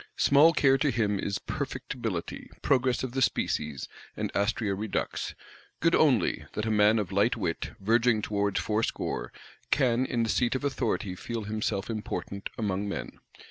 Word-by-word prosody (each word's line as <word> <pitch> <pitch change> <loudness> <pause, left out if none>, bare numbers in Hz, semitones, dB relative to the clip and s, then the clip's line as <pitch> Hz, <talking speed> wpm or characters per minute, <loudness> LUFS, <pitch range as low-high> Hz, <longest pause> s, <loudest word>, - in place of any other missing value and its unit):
Small 145 +4 +6
care 135 -4 +4
to 150 - +2
him 105 -5 +1
is 100 0 -1
Perfectibility, 115 -9 -4
Progress 130 -2 +2
of 130 - -3
the 135 +1 -2
Species, 75 - 0 0.3
and - - -3
Astræa 100 0 0
Redux: 105 +1 -3 0.4
good - - +3
only, - - +3
that 105 - -2
a 110 - 0
man 105 +1 +5
of 105 -3 -2
light 100 +5 +2
wit, 90 -6 -3
verging 115 +1 +3
towards 100 -1 0
fourscore, 105 - -2 0.4
can 130 -2 +2
in 120 -2 0
the 115 - -1
seat 120 +3 +1
of 130 - -2
authority 125 -8 -1
feel 115 +4 -5
himself 105 -1 -2
important 105 -2 -4
among 100 -2 -1
men. - - -5
110 Hz, 155 wpm, -28 LUFS, 100-125 Hz, 0.4 s, Small